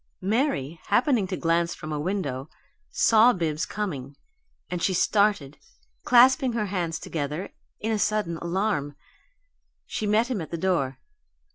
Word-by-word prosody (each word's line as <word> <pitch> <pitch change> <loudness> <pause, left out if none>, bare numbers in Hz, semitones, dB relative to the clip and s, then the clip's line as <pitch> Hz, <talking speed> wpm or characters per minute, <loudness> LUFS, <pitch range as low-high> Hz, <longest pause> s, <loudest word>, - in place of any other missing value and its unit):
Mary, 190 - 0
happening 240 -6 +2
to 185 - -3
glance 170 0 +1
from 155 - -8
a 150 - -2
window, 150 -6 -3 0.4
saw 225 +2 +5
Bibbs 165 -2 -2
coming, 145 -10 -5 0.5
and 180 -1 -4
she 185 - +1
started, 200 -8 +1 0.5
clasping 255 +1 +5
her 220 -2 -1
hands 175 -5 -2
together 150 +4 -4 0.3
in 220 - -2
a 215 - 0
sudden 205 -6 0
alarm. 170 -5 -1 0.9
She 215 - -3
met 215 +3 +3
him 215 -8 -1
at 160 - -7
the 170 - -4
door. 160 -7 0
185 Hz, 140 wpm, -25 LUFS, 155-215 Hz, 0.9 s, saw